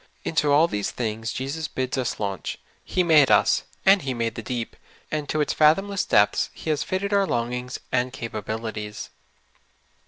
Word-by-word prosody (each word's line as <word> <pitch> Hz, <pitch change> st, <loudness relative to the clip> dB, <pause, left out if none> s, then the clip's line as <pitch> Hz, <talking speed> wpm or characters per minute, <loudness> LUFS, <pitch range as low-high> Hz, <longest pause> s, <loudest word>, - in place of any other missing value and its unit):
Into 150 Hz, -3 st, +1 dB
all 150 Hz, +4 st, +5 dB
these 105 Hz, -9 st, -2 dB
things 115 Hz, -1 st, -3 dB
Jesus 140 Hz, +4 st, -3 dB
bids 130 Hz, 0 st, -3 dB
us 130 Hz, -3 st, -2 dB
launch. 100 Hz, -3 st, -3 dB, 0.3 s
He 180 Hz, -, 0 dB
made 155 Hz, -5 st, +6 dB
us, -, -, +4 dB, 0.2 s
and 195 Hz, +1 st, +6 dB
He 135 Hz, -3 st, -3 dB
made 115 Hz, -1 st, -1 dB
the 115 Hz, -, -6 dB
deep, 120 Hz, 0 st, -4 dB, 0.4 s
and 150 Hz, -2 st, -3 dB
to 155 Hz, -, +1 dB
its 150 Hz, -, 0 dB
fath 155 Hz, +1 st, +5 dB
omless 200 Hz, 0 st, -3 dB
depths 105 Hz, 0 st, +3 dB
He 160 Hz, -, -3 dB
has 150 Hz, -, 0 dB
fitted 200 Hz, +2 st, -2 dB
our 200 Hz, -1 st, +3 dB
longings 125 Hz, 0 st, -2 dB
and 125 Hz, 0 st, +1 dB
capabil 110 Hz, -3 st, -5 dB
ities. 105 Hz, -1 st, -6 dB
130 Hz, 180 wpm, -24 LUFS, 115-155 Hz, 0.4 s, made